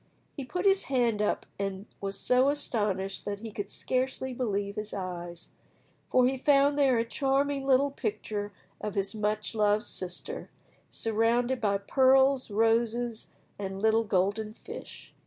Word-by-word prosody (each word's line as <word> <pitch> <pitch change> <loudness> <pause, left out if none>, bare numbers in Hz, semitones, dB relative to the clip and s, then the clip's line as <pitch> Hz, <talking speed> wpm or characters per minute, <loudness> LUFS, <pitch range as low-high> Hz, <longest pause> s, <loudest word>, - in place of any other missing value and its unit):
He 280 - -5
put 360 +8 -3
his 390 0 +4
hand 240 -5 +1
up, 210 - 0
and 195 0 -3
was 195 0 -3
so 255 +2 +3
astonished 205 -9 -1
that 200 0 -4
he 225 -1 -6
could 205 -1 -5
scarcely 260 0 -2
believe 205 -5 -2
his 210 0 -4
eyes, 175 -3 -6 0.6
for 255 -1 +4
he 265 +1 +1
found 285 +1 +4
there 275 -4 +4
a 230 - +1
charming 275 +2 0
little 275 +1 +4
picture 210 -4 -3 0.3
of 210 -2 -4
his 195 0 -1
much 215 0 -1
loved 210 0 +2
sister, 180 -1 -5 0.4
surrounded 235 +3 +1
by 200 -2 +2
pearls, 265 +4 +4
roses, 225 +2 +1 0.3
and 195 -1 -4
little 220 +2 +3
golden 205 +2 0
fish. - - -10
225 Hz, 145 wpm, -29 LUFS, 205-260 Hz, 0.6 s, his